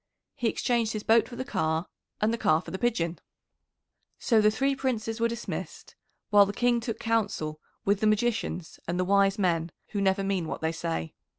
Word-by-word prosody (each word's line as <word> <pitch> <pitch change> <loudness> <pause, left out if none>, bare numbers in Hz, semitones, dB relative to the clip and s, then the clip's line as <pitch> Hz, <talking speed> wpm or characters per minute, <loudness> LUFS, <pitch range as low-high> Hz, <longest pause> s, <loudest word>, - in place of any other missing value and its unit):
"He 245 -5 -1
exchanged 235 -2 0
his 215 -1 -4
boat 225 0 +4
for 245 - -8
the 260 - -4
car 165 - 0 0.3
and 215 +2 +2
the - - 0
car 155 -5 +3
for 165 - -9
the 190 - -4
pigeon." 175 -9 0 1.0
So 225 -3 +3
the 210 - +5
three 270 +6 +1
Princes 230 -4 -2
were 230 - +3
dismissed, 230 -1 -6 0.4
while 205 -1 +7
the 200 - -3
King 240 +1 +2
took 230 -1 -4
counsel 200 -9 -1 0.3
with 200 0 +2
the 215 - +2
magicians 215 -5 -1
and 175 +1 -1
the 180 - +1
wise 200 +1 +3
men 170 -4 +1 0.2
who 205 - -2
never 195 0 +2
mean 195 -4 -1
what - - -5
they 160 0 0
say. 80 - -3
210 Hz, 195 wpm, -28 LUFS, 180-230 Hz, 1.0 s, while